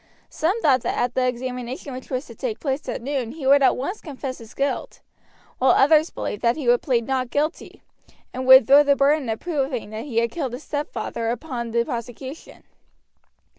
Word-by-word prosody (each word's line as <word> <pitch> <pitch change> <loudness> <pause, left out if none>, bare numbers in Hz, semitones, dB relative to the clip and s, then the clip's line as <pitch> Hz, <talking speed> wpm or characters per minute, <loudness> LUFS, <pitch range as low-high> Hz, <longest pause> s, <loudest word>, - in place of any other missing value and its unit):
Some 365 +8 0
thought 260 -4 +4
that - - -2
at 245 0 0
the 255 -1 +1
examination 250 +2 -4
which 255 +1 -9
was 255 +2 -3
to - - -11
take 460 -4 -4
place 275 0 -3
at - - -4
noon 260 -3 -3
he 300 -3 -7
would 280 +1 +6
at 270 - +4
once 370 +11 -4
confess 270 -4 -6
his 225 -2 -13
guilt, 275 0 -2 0.6
while 260 - +5
others 310 +3 +4
believed 205 - -5
that 235 0 +2
he 290 -6 -5
would 240 0 +4
plead 240 -4 0
not 260 -1 -1
guilty, 300 +5 -3 0.5
and 255 0 -4
would 260 -2 +9
throw 280 +5 +7
the 285 -1 +3
burden 280 -2 +2
of 220 - -2
proving 270 -9 -3
that 220 +3 -6
he 235 -4 +1
killed 265 -2 -4
his 255 +5 -7
stepfather 235 -6 -3
upon 240 -1 -4
the 235 +1 +1
prosecution. 255 +3 -7
260 Hz, 195 wpm, -23 LUFS, 240-290 Hz, 0.6 s, would